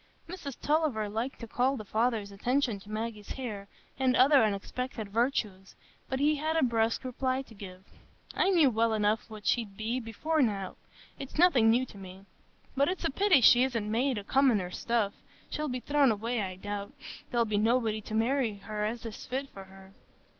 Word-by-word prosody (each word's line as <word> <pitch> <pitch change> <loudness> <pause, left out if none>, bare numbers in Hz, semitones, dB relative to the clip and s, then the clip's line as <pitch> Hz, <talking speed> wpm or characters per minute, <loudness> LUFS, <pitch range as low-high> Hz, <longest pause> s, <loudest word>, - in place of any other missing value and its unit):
Mrs 330 -7 -7
Tulliver 290 -8 +1
liked 225 +6 -4
to 230 - -6
call 255 +4 +1
the 215 - -7
father's 220 -1 0
attention 240 +2 0
to 200 - -15
Maggie's 215 -1 -5
hair 215 -7 -6 0.3
and 260 -1 +3
other 270 +1 +6
unexpected 215 +2 -3
virtues, 210 -4 -1 0.3
but 265 - -2
he 300 +2 +3
had 315 +2 -1
a 320 - +3
brusque 230 -1 +1
reply 260 +1 -1
to 235 - -16
give. 190 -3 -10 0.5
"I 375 - +2
knew 325 -8 +5
well 225 0 +1
enough 215 +1 0
what 215 -1 -10
she'd 210 -5 0
be, 225 +4 -2
before 295 +8 -1
now,—it's 210 +5 -5
nothing 290 -10 +5
new 245 +3 +3
to 205 - -13
me. 190 0 -11 0.5
But 280 +1 +3
it's 370 - -3
a - - +1
pity 385 -2 +4
she 240 +2 +7
isn't 230 -5 -1
made 250 +2 +1
o' 205 - -4
commoner 225 -7 +2
stuff; 220 -1 -1 0.4
she'll 305 0 -2
be 250 0 -3
thrown 285 -2 +3
away, 225 +2 -2
I 185 -2 -4
doubt,—there'll 205 +4 -4
be 210 -2 0
nobody 225 -1 +1
to 215 - -6
marry 235 0 +1
her 210 +1 -5
as 225 +2 -3
is 225 - -8
fit 265 +2 -3
for 195 -5 -11
her." 190 0 -16
230 Hz, 180 wpm, -29 LUFS, 210-265 Hz, 0.5 s, she